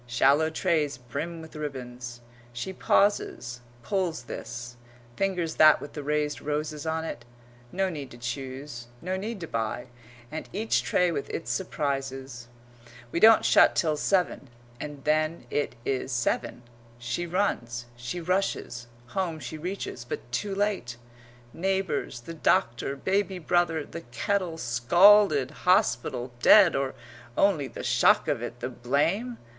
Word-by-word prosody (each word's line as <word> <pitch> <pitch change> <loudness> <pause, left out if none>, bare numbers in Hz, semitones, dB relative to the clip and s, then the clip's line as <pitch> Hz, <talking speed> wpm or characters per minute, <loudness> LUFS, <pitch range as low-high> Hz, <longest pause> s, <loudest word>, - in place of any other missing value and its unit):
Shallow 140 +6 +3
trays 160 -4 0
brim 145 +7 -5
with 160 - -13
ribbons. 125 -5 -6 0.3
She 155 +11 -4
pauses, 180 - +1 0.2
pulls 180 -7 -1
this, 120 0 -7 0.4
fingers 180 -4 -1
that 155 0 +7
with 145 - -9
the 150 - -5
raised 150 0 -1
roses 150 +1 -3
on 160 0 -1
it 140 - -6 0.5
no 190 +1 0
need 145 -7 -5
to 120 - -12
choose, 130 +1 -6
no 185 +7 -3
need 210 +3 -4
to 165 - -5
buy, 115 +1 -3 0.4
and 160 - -6
each 220 +3 +1
tray 180 -1 +2
with 140 -4 -3
its - - -4
surprises. 135 -7 -3 0.6
"We - - 0
don't 220 +2 +7
shut - - +6
till 155 -3 +2
seven," 175 -4 0 0.3
and 145 -2 -7
then 155 -1 +1
it 145 - -1
is 135 0 -1
seven. 120 0 -1 0.3
She 125 +9 -3
runs, 120 - -1
she 120 +8 -5
rushes, 175 -9 -1 0.2
home 170 +1 -2
she 135 +3 -6
reaches, 170 -6 -5
but 120 0 -7
too 195 +11 -2
late. 195 - -1 0.6
Neighbours 190 -9 -1
the 165 - -8
doctor 130 -4 +1
baby 190 +5 0
brother 165 -2 +1
the 170 - -8
kettle 170 +7 -2
scalded 155 - +5 0.2
hospital 120 -6 +2
dead 195 +2 +7
or 135 -1 -1 0.4
only 170 -9 +3
the - - -8
shock - - +4
of - - 0
it, - - -6
the 125 - -2
blame? 155 - 0
150 Hz, 140 wpm, -27 LUFS, 125-180 Hz, 0.6 s, that